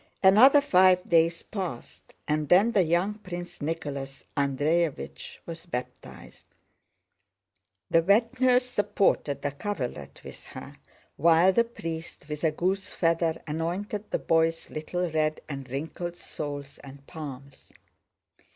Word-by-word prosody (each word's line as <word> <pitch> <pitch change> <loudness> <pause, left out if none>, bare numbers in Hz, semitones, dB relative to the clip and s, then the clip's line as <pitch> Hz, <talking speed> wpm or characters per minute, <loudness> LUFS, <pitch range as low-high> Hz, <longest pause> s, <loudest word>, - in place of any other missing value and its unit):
Another 245 +10 +7
five 185 -8 +4
days 165 0 +3
passed, 180 - -7
and 150 -1 -1
then 200 +6 +5
the 205 - +4
young 180 +5 0
Prince 175 -3 -8
Nicholas 140 -3 -4
Andréevich 145 - -1
was 165 +1 -8
baptized. 125 -5 -8 1.4
The 165 - +5
wet 230 +8 +2
nurse 250 -1 +4
supported 205 - 0
the 145 - -1
coverlet 140 - -5
with - - -10
her - - -9
chin, - - -20 0.4
while 170 +4 +5
the 235 +3 +3
priest 165 -9 -7
with 150 +1 -5
a 160 - +4
goose 185 +5 -1
feather 165 -1 0
anointed 180 +7 -3
the - - 0
boy's 165 0 +1
little 175 +4 -2
red 155 -1 0
and 135 -3 -7
wrinkled 160 +6 -5
soles 145 -3 -7
and 140 0 -13
palms. 140 -4 -10
165 Hz, 125 wpm, -27 LUFS, 145-190 Hz, 1.4 s, Another